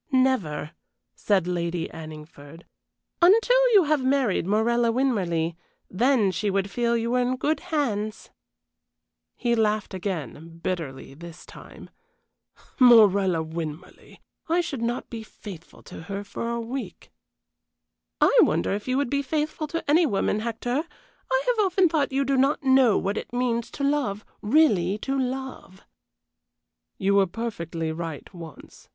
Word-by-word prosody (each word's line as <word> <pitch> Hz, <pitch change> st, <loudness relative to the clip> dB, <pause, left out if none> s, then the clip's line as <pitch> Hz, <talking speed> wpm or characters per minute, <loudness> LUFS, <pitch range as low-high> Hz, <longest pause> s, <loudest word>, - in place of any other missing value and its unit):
"Never," 255 Hz, -, +1 dB, 0.4 s
said 195 Hz, -4 st, +1 dB
Lady 170 Hz, -1 st, -2 dB
Anningford, 155 Hz, 0 st, -11 dB, 0.6 s
"until 475 Hz, +7 st, +5 dB
you 400 Hz, -3 st, +7 dB
have 300 Hz, -3 st, +1 dB
married 260 Hz, -9 st, +1 dB
Morella 230 Hz, +3 st, +2 dB
Winmarleigh; 185 Hz, -10 st, 0 dB, 0.4 s
then 225 Hz, 0 st, +2 dB
she 200 Hz, +4 st, -2 dB
would 195 Hz, 0 st, -1 dB
feel 235 Hz, -1 st, +1 dB
you 230 Hz, +1 st, -2 dB
were 250 Hz, -, +2 dB
in 250 Hz, +1 st, 0 dB
good 295 Hz, +5 st, -1 dB
hands." 235 Hz, -, -3 dB, 1.0 s
He 240 Hz, -1 st, 0 dB
laughed 215 Hz, -3 st, 0 dB
again 165 Hz, -, -6 dB
bitterly 145 Hz, -8 st, -4 dB
this 170 Hz, +3 st, -12 dB
time. -, -, -13 dB, 0.9 s
"Morella 200 Hz, -8 st, +6 dB
Winmarleigh! 160 Hz, +1 st, -8 dB, 0.3 s
I 345 Hz, +2 st, +2 dB
would 270 Hz, -5 st, -5 dB
not 235 Hz, +1 st, -2 dB
be 230 Hz, -2 st, -5 dB
faithful 200 Hz, -5 st, -12 dB
to -, -, -10 dB
her 200 Hz, +4 st, -5 dB
for 230 Hz, +3 st, -5 dB
a 235 Hz, 0 st, -2 dB
week!" 245 Hz, +3 st, -7 dB, 1.1 s
"I -, -, +4 dB
wonder -, -, +2 dB
if 205 Hz, +3 st, -5 dB
you 255 Hz, +1 st, 0 dB
would 280 Hz, -2 st, 0 dB
be 280 Hz, 0 st, +1 dB
faithful 305 Hz, +2 st, -2 dB
to 330 Hz, +2 st, -5 dB
any 320 Hz, +3 st, +4 dB
woman, 205 Hz, -2 st, 0 dB
Hector? 235 Hz, +5 st, -2 dB, 0.5 s
I -, -, +2 dB
have 480 Hz, -4 st, +2 dB
often 380 Hz, -1 st, +3 dB
thought 305 Hz, -4 st, 0 dB
you 275 Hz, +1 st, 0 dB
do 275 Hz, 0 st, +1 dB
not 275 Hz, +4 st, +2 dB
know 260 Hz, -4 st, +4 dB
what 200 Hz, +2 st, -1 dB
it -, -, -10 dB
means 240 Hz, -1 st, -1 dB
to 280 Hz, -, -6 dB
love 275 Hz, -8 st, -1 dB, 0.2 s
really 210 Hz, -, +3 dB
to 270 Hz, -, -1 dB
love." 260 Hz, -7 st, -5 dB, 1.1 s
"You 195 Hz, 0 st, +1 dB
were 200 Hz, -1 st, +4 dB
perfectly 170 Hz, -6 st, -4 dB
right 160 Hz, -2 st, -6 dB
once. 165 Hz, -3 st, -12 dB
225 Hz, 145 wpm, -25 LUFS, 180-270 Hz, 1.1 s, you